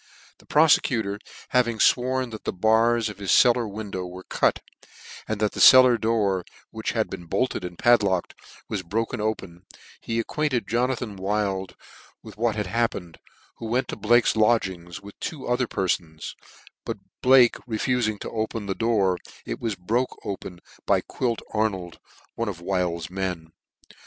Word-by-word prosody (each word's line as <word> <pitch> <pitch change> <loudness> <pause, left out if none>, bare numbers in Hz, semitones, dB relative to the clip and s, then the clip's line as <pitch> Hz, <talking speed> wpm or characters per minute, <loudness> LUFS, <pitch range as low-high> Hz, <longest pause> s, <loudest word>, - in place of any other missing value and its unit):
The - - -22
profecutor 120 -9 +3 0.3
having 120 -3 +2
fworn 130 +2 +2
that 110 - -8
the - - -1
bars 110 +4 +3
of 105 -1 -8
his 100 -2 -1
cel 120 -2 +7
lar 120 -1 -2
wii^ow 100 -3 -5
were 90 +1 -10
cut, - - +1 0.7
aqd 110 - -1
that 105 0 0
the - - -4
cellar 130 -2 +8
door, 105 -5 +1 0.3
which - - -3
had - - 0
been 85 - -8
bolted 125 +2 -1
and 90 -1 -7
padlocked, 105 -7 +3 0.3
was 100 - -3
broke 110 +6 -2
open, 95 -5 -3 0.4
he 115 - -3
acquainted 130 -3 -1
Jonathan 120 -2 -1
Wild 95 -2 -2 0.5
with - - -11
what 115 0 0
had 105 -1 -2
happened, 95 -5 -2 0.4
who 115 - -6
went 125 +4 0
to - - -3
Blake's 115 +3 +3
lodgings, 95 -5 0
with 100 0 -10
two 150 -5 -5
other 125 0 +1
perfons, 85 -6 -2 0.5
but - - -4 0.2
Bhke 125 -2 +5
refuting 110 -1 0
to - - -5
open 110 -1 -3
the 100 - -1
door, 100 -5 +1 0.3
it - - -4
was 115 -3 -2
broke 115 +8 -1
open 90 -3 -6 0.3
by - - +3
Quilt 120 -3 -3
Ar 110 0 +2
nold, 90 -4 -8 0.3
one 115 -1 -2
of 90 -5 -6
Wild's 90 -2 -2
men. 90 -4 -4
110 Hz, 160 wpm, -25 LUFS, 95-120 Hz, 0.7 s, cellar